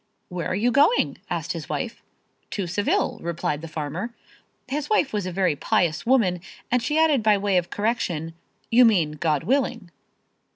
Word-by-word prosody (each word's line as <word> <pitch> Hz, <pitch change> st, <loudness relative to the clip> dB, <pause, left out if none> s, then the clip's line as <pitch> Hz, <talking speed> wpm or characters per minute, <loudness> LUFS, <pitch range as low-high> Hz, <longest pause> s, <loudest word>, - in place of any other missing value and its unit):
"Where 180 Hz, -2 st, -3 dB
are 185 Hz, -, -1 dB
you 235 Hz, +5 st, +2 dB
going?" 290 Hz, -, +3 dB
asked -, -, -2 dB
his -, -, -7 dB
wife. -, -, -4 dB, 0.5 s
"To 200 Hz, -, -3 dB
Seville," 195 Hz, +4 st, 0 dB
replied 170 Hz, -3 st, -2 dB
the 165 Hz, -, -7 dB
farmer. 160 Hz, +9 st, -5 dB, 0.5 s
His 290 Hz, +2 st, -3 dB
wife 375 Hz, -, +2 dB
was 205 Hz, -3 st, -1 dB
a -, -, -3 dB
very 180 Hz, -3 st, +1 dB
pious 155 Hz, +5 st, 0 dB
woman 200 Hz, -9 st, +3 dB, 0.3 s
and 250 Hz, 0 st, +3 dB
she 300 Hz, +6 st, -1 dB
added 315 Hz, -5 st, +4 dB
by 210 Hz, -1 st, +4 dB
way 200 Hz, -1 st, 0 dB
of 175 Hz, -1 st, 0 dB
correction, 185 Hz, -8 st, -2 dB, 0.4 s
"You 245 Hz, +2 st, +7 dB
mean, 185 Hz, -10 st, +4 dB
God 150 Hz, -2 st, 0 dB
willing." 245 Hz, -8 st, 0 dB
200 Hz, 170 wpm, -24 LUFS, 170-245 Hz, 0.5 s, You